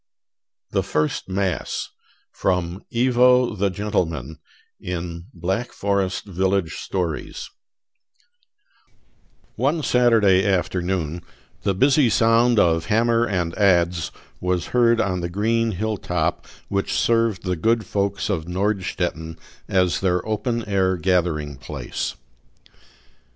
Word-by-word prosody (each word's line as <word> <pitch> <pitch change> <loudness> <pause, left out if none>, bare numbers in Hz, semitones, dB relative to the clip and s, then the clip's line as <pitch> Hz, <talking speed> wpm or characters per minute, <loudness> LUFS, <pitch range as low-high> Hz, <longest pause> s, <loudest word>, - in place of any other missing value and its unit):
THE - - +1
FIRST 75 +4 -1
MASS 95 -1 -2 0.4
From 90 0 -1
"Ivo 125 0 +4
the 100 -1 0
Gentleman," 80 -7 -2 0.4
in 85 0 -5
"Black 95 +8 -3
Forest 100 -2 -1
Village 95 -2 -1
Stories" 90 -5 -4 2.1
One 150 +4 +1
Saturday 110 -8 +4
afternoon 90 -3 -1 0.4
the 100 -2 0
busy 135 +4 +4
sound 115 +2 +4
of 80 -4 +3
hammer 115 +2 +2
and 90 -5 -1
adze 85 -4 +3 0.3
was 90 -1 -1
heard 120 -1 +4
on 90 -3 0
the 85 - -3
green 115 +4 0
hill 110 +3 -2
top 90 -2 -2 0.2
which 100 0 -1
served 115 -3 +1
the 90 -1 -1
good 110 +6 +1
folks 100 +2 -1
of 85 -7 -2
Nordstetten 90 -4 -2 0.3
as 90 -2 +2
their 90 0 0
open 115 +2 -1
air 95 -2 +1
gathering 85 -5 0
place. - - -5
95 Hz, 110 wpm, -22 LUFS, 90-110 Hz, 2.1 s, Ivo